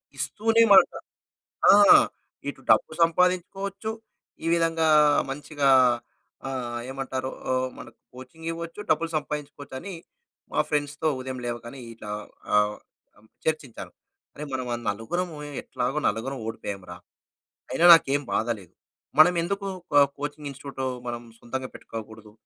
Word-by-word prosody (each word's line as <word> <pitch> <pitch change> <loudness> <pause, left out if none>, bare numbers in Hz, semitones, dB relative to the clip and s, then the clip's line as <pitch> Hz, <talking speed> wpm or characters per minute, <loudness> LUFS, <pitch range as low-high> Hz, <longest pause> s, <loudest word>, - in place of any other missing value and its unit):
ఇస్తూనేమాట. 225 -2 +4 0.8
ఆ! - - +9 0.7
ఇటు 140 - -6
డబ్బు 110 - +4
సంపాదించుకోవచ్చు. 185 +5 +1 0.5
ఈ - - -2
విధంగా 165 -1 +2 0.4
మంచిగా 145 0 -1 0.8
ఆహ్, 125 -3 -4
ఏమంటారు? 130 -1 -4 0.2
ఆహ్, 130 0 +1
మనకు - - -12 0.2
కోచింగ్ 130 +6 -11
ఇవ్వచ్చు, 170 +3 -7
డబ్బులు 165 0 +1
సంపాదించుకోవచ్చని 150 +2 -5 0.6
మా - - +2
ఫ్రెండ్స్‌తో 145 +1 -1
ఉదయం 130 0 -5
లేవగానే 120 +2 -6
ఇట్లా 105 -2 -9 0.4
ఆహ్, 105 0 +3 0.4
అం 105 - -22 0.2
చర్చించాను. 155 -7 -3 0.4
అరె! 150 - -6
మనం 130 -1 -3
అం 120 - -4
నలుగురము 155 - -3 0.3
ఎట్లాగో 135 +5 -2
నలుగురం 120 +5 -3
ఓడిపోయామురా! 100 -5 -6 0.8
అయినా 165 +7 +2
నాకేం 145 -3 +4
బాధ 110 - +1
లేదు. 90 -4 -17 0.5
మనమెందుకు 180 +4 +4 0.2
కో 145 - +6 0.2
కోచింగ్ 145 0 -5
ఇన్‌స్టిట్యూట్ 135 0 -8 0.3
మనం 120 0 -4 0.2
సొంతంగా 130 +2 -5
పెట్టుకోకూడదు? 110 -1 -9
140 Hz, 110 wpm, -26 LUFS, 120-165 Hz, 0.8 s, ఆ